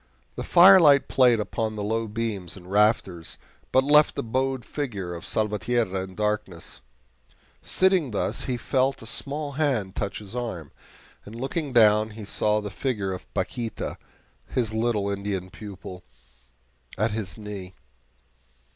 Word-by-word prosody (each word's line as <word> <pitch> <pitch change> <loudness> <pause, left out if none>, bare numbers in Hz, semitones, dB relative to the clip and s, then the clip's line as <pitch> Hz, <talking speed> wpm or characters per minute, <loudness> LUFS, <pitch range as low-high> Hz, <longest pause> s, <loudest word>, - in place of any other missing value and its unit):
The - - -4
firelight 170 -6 +7
played 125 -3 +4
upon 110 +1 -2
the 105 - -4
low 115 +2 -1
beams 105 -6 -4
and 90 0 -12
rafters, 100 -5 +1 0.3
but 130 - +4
left 150 +2 +5
the - - -2
bowed 130 +2 -1
figure 100 -12 -4
of 85 - -7
Salvatierra 105 -1 0
in 95 0 -8
darkness. 105 -9 -3 0.8
Sitting 185 -6 +2
thus, 105 - -2
he 125 -2 -1
felt 130 +1 0
a - - -10
small 145 +5 -4
hand 135 -10 -1
touch 100 -1 -3
his 105 +2 -10
arm, 105 - -5 0.5
and 105 - -11
looking 135 +4 -3
down, 110 -2 +5
saw 105 +1 +1
the 105 -1 -6
figure 105 -8 -2
of 90 - -9
Paquita, 115 -3 -3 0.5
his 115 -4 -1
little 110 -3 0
Indian 100 -2 -3
pupil, 95 -3 -9 0.9
at 110 +3 +1
his 105 -2 -4
knee. 100 -4 -8
110 Hz, 140 wpm, -25 LUFS, 100-130 Hz, 0.9 s, firelight